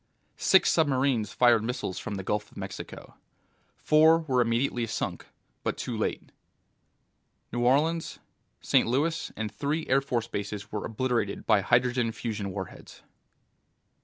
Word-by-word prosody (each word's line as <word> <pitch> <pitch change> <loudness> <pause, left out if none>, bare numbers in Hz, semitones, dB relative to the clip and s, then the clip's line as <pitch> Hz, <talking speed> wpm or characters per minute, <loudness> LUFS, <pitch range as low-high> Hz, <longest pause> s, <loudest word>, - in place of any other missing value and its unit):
Six 190 - +4
submarines 130 -8 +1
fired 120 -3 +4
missiles 120 -5 -3
from 105 - -5
the 95 - -5
Gulf 105 +2 -2
of - - -17
Mexico. 95 0 -8 0.6
Four 160 +2 +5
were 130 -6 +1
immediately 120 0 0
sunk, 110 - -4 0.3
but - - -2
too - - -4
late. - - -3 1.2
New 120 - -1
Orleans, 155 +6 +1 0.4
St. - - +3
Louis 150 +7 0
and 110 -1 -3
three 150 +3 -2
Air 135 +1 +3
Force 120 -4 -2
bases 105 -1 -5
were 105 - -3
obliterated 115 -3 -1
by 105 -3 +4
hydrogen 120 +2 +2
fusion 110 -4 -4
warheads. 95 -1 -8
120 Hz, 135 wpm, -28 LUFS, 105-140 Hz, 1.2 s, Four